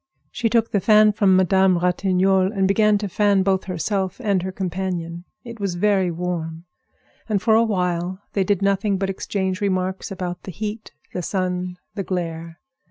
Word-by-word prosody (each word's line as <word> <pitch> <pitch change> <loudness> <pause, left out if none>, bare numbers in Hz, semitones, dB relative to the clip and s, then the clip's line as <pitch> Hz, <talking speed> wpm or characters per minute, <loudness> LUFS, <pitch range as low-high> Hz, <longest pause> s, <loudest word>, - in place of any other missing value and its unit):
She 230 -2 -1
took 230 0 +1
the 205 - +2
fan 215 +2 +5
from 200 -2 +4
Madame 190 0 +4
Ratignolle 185 +1 +2
and 195 -3 +1
began 210 +1 +3
to 205 0 -3
fan 200 0 +2
both 190 -1 +1
herself 190 +2 -2
and 200 -6 +1
her 190 +1 -4
companion. 180 -2 -4 0.2
It 235 -2 -9
was 195 -3 -2
very 190 0 +2
warm, 170 -1 -4 0.6
and 210 -2 +2
for 220 - +2
a 225 - +6
while 180 -3 -1
they 195 - +2
did 200 0 0
nothing 200 0 +1
but 195 0 -1
exchange 190 0 -3
remarks 185 -1 -1
about 180 -2 -5
the 190 - -8
heat, 215 +4 -6 0.2
the 180 - -2
sun, 180 0 -2 0.2
the 205 - -3
glare. 165 -3 -4
190 Hz, 170 wpm, -22 LUFS, 180-205 Hz, 0.6 s, a